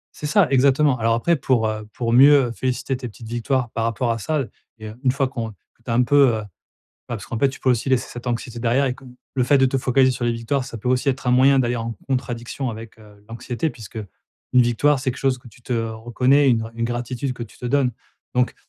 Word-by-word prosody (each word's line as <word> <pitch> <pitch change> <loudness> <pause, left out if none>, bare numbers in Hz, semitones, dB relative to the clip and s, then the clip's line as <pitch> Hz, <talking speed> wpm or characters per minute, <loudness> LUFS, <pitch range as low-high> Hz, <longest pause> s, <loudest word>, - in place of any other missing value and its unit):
C'est 150 - -5
ça 180 +3 +4
exactement. 135 0 +3
Alors 115 +1 +2
après 170 +9 +2
pour, 130 -5 +1
heu, 110 -1 -4
pour 115 0 -2
mieux 135 -1 +6
féliciter 130 +2 -2
tes 125 -1 -6
petites 110 +1 -12
victoires, 120 +1 -1
par 115 - -2
rapport 115 +1 0
à 115 - -2
ça 145 +5 -1 0.3
et 110 -1 -9
heu, 105 - -10
une 130 - +3
fois 135 0 0
qu'on 120 -4 -4
que 105 +3 -27
tu 120 - -10
as - - +1
un 125 - +4
peu, 140 +2 +5
heu - - +3
bah - - -9 0.7
parce - - -10
qu'en 115 - -4
fait 140 - +3
tu 130 - -12
peux 130 - +2
aussi 120 +1 0
laisser 130 -2 +1
cette 120 +1 -9
anxiété 120 0 -3
derrière 120 +4 +2
et 125 - -1
comme 130 -1 -15 0.2
le 130 -2 +1
fait 140 +2 +4
de 135 - +5
te 135 +1 0
focaliser 130 +1 +3
sur 125 -1 -3
les 120 - +1
victoires. 115 +4 -2
Ça 125 - -8
peut 115 +3 -4
aussi 125 +2 +1
être 130 -1 -1
un - - +4
moyen 135 +2 +5
d'aller 120 -1 0
en 115 0 -3 0.2
contradiction 125 0 -3
avec, 110 0 -8
heu, 105 -1 -18
l'anxiété. 120 +6 -3
Puisque, 115 -4 -12
heu, 105 -3 -6 0.4
une 125 -1 +6
victoire, 130 +5 +2
c'est 130 0 -1
quelque - - -10
chose 135 -2 +1
que 125 - -19
tu 120 +2 -20
te - - -5
reconnais, 120 +5 +2
une 115 -2 0
une 115 - -2
gratitude 120 +3 -3
que 120 -1 -6
tu 110 - -17
te 125 - -5
donnes. 130 -1 +1 0.4
Donc 125 0 +1
125 Hz, 255 wpm, -22 LUFS, 115-135 Hz, 0.7 s, mieux